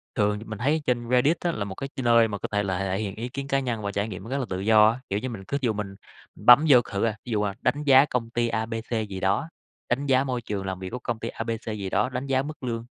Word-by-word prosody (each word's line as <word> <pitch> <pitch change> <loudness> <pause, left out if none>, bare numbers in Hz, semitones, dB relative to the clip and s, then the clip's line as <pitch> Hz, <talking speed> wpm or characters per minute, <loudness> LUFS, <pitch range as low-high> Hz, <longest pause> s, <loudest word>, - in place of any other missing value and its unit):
Thường 105 -2 +1
thì 110 - -10
mình 110 -1 -7
thấy 150 +6 +1
trên 120 -1 -1
Reddit 130 +7 +3
á 175 - 0
là 105 -9 -3
một 95 -1 -7
cái 135 - -5
ch 135 - -7
nơi 115 -1 +5
mà 105 -2 -4
có - - -4
thể 105 0 +1
là 95 -2 -2
thể 95 +1 -1
hiện 100 -2 -4
ý 115 +3 -5
kiến 140 +2 -5
cá 135 -1 +1
nhân 120 -4 -3
và 100 -1 -3
trải 100 +1 -1
nghiệm 95 -3 -7
nó 115 - -9
rất 135 - -1
là 135 - -1
tự 95 0 -3
do 105 +1 +6
á. 115 +3 -3
Kiểu 100 - 0
như, 130 - -4
mình 110 -5 -7
cứ 140 - -1
ví - - 0
dụ 110 - +2
mình 100 -2 -5 0.4
bấm 125 +6 +7
vô 125 -4 +8
c - - -17
thử 100 -1 -1
à, 110 -2 0
ví 125 - -6
dụ, 105 -2 +1
à, 100 -1 -1
đánh 150 +1 0
giá 135 -1 +7
công 125 -5 -2
ty 120 0 0
A, 110 -1 -1
B, 115 - -6 0.2
C 110 -2 -1
gì 95 - -5
đó, 100 +12 0 0.4
đánh 130 +4 0
giá 135 -1 +3
môi 125 -3 -2
trường 100 -4 -4
làm 95 -1 -4
việc 95 -1 -6
của 125 - -5
công 120 -2 -3
ty 115 - -4
A,B, 115 +1 -5
C 110 -1 -5
gì 100 -2 -4
đó, 125 - +1
đánh 130 +2 -4
giá 135 -1 +2
mức 150 -1 -8
lương, 115 -2 -3
115 Hz, 330 wpm, -25 LUFS, 105-130 Hz, 0.4 s, vô